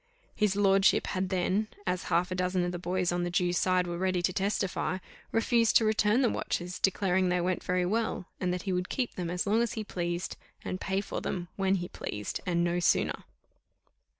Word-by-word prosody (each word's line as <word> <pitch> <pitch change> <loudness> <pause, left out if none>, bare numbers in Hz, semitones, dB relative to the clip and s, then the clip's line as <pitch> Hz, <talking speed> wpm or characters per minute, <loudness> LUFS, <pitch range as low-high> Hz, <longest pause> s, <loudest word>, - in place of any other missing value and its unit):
His 210 -2 +1
lordship 195 -1 +4
had 185 -1 -2
then, 190 +3 +1 0.2
as 180 -1 -1
half 180 +2 +1
a - - -1
dozen 180 0 0
of 175 - -2
the 175 - -5
boys 180 0 0
on 175 0 0
the 175 - -1
Jew's 175 0 +1
side 185 -1 +2
were 175 0 -4
ready 185 -1 0
to 185 - +1
testify, 195 -1 -1 0.3
refused 230 0 +4
to 225 - +2
return 215 +3 +3
the 240 - +4
watches, 180 +1 -3
declaring 190 -1 +2
they 180 0 +2
went 180 +1 -1
very 180 0 +1
well, 220 -1 -1
and 180 -1 0
that 180 -1 -3
he 190 - -1
would 180 0 -1
keep 255 -3 -1
them 175 -2 -4
as 180 +1 -1
long 215 +3 +3
as 235 - 0
he 220 - -3
pleased, 175 -3 -3 0.3
and 185 - -4
pay 195 0 0
for - - -5
them 175 -1 -3
when 195 0 +2
he 175 -2 -3
pleased, 105 - -5
and 170 -1 +2
no 175 0 +1
sooner. 175 - +1
185 Hz, 210 wpm, -29 LUFS, 175-195 Hz, 0.3 s, lordship